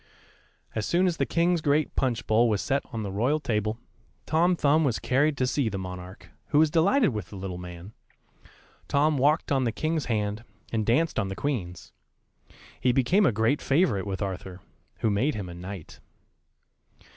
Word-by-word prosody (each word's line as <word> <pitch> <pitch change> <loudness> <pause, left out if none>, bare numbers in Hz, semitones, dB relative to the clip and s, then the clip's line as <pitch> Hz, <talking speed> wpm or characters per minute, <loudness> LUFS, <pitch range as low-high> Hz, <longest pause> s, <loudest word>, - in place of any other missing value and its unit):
] - - -33 0.3
As 110 -2 -2
soon 180 +2 +2
as 175 -3 0
the - - 0
king's 170 0 +2
great 150 +1 +1
punch 125 -4 0
bowl 115 +2 +3
was 105 -2 +1
set 140 +6 0
on 110 -1 -4
the 100 - -4
royal 125 +10 +1
table, 110 -5 -1 0.5
Tom 170 +3 +3
Thumb 155 0 +3
was 125 -6 +1
carried 145 +3 +1
to 130 - +1
see 130 -2 0
the 100 - -4
monarch, 90 -1 -8 0.2
who - - +1
was 155 0 +5
delighted 200 - +3
with 105 -8 -5
the - - -10
little 95 -2 -5
man. 90 +3 -9 0.9
Tom 145 0 +2
walked 150 +5 +2
on 135 -2 +2
the 120 - +1
King's 155 +5 -1
hand, 105 -1 -2 0.3
and 110 -2 -1
danced 140 +4 +2
on 100 - -1
the 95 - -5
Queen's. 95 -12 -4 0.9
He 125 - +3
became 165 - +3
a - - +3
great 110 +7 +1
favourite 130 - +1
with 95 +1 -3
Arthur, 95 -1 -6 0.4
who 110 - +2
made 120 +8 +1
him 100 -4 -5
a 85 - -8
knight. 90 0 -9
120 Hz, 185 wpm, -27 LUFS, 100-150 Hz, 0.9 s, was